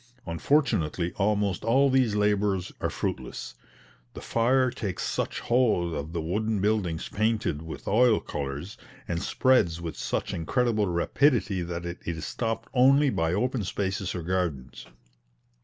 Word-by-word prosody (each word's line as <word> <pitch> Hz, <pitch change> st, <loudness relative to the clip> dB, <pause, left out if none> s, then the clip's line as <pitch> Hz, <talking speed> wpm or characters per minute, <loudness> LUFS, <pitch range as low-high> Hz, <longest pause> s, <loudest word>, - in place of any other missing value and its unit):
Unfortunately 85 Hz, -, +1 dB
almost 100 Hz, -1 st, +1 dB
all 135 Hz, +4 st, +4 dB
these 130 Hz, -5 st, +3 dB
labours 105 Hz, -3 st, +1 dB
are -, -, 0 dB
fruitless. -, -, -4 dB, 0.6 s
The -, -, -6 dB
fire 125 Hz, +2 st, +2 dB
takes 95 Hz, -6 st, -4 dB
such -, -, -2 dB
hold 110 Hz, -9 st, +2 dB
of 75 Hz, +1 st, -4 dB
the 85 Hz, -1 st, -2 dB
wooden 105 Hz, +5 st, -1 dB
buildings 95 Hz, -5 st, 0 dB
painted 110 Hz, -8 st, 0 dB
with 80 Hz, 0 st, -8 dB
oil 115 Hz, +1 st, +4 dB
colours, 70 Hz, +6 st, -5 dB, 0.3 s
and 85 Hz, -1 st, -2 dB
spreads 105 Hz, -11 st, +2 dB
with 85 Hz, -2 st, -5 dB
such -, -, -3 dB
incredible 110 Hz, +4 st, +1 dB
rapidity 100 Hz, -, +2 dB
that 85 Hz, 0 st, -4 dB
it 85 Hz, 0 st, -5 dB
is 80 Hz, -3 st, -4 dB
stopped 115 Hz, -2 st, -3 dB
only 135 Hz, +2 st, +5 dB
by 80 Hz, -4 st, 0 dB
open 125 Hz, +3 st, 0 dB
spaces 95 Hz, 0 st, -2 dB
or 90 Hz, -, -4 dB
gardens. 85 Hz, -10 st, -3 dB
100 Hz, 140 wpm, -27 LUFS, 85-115 Hz, 0.6 s, only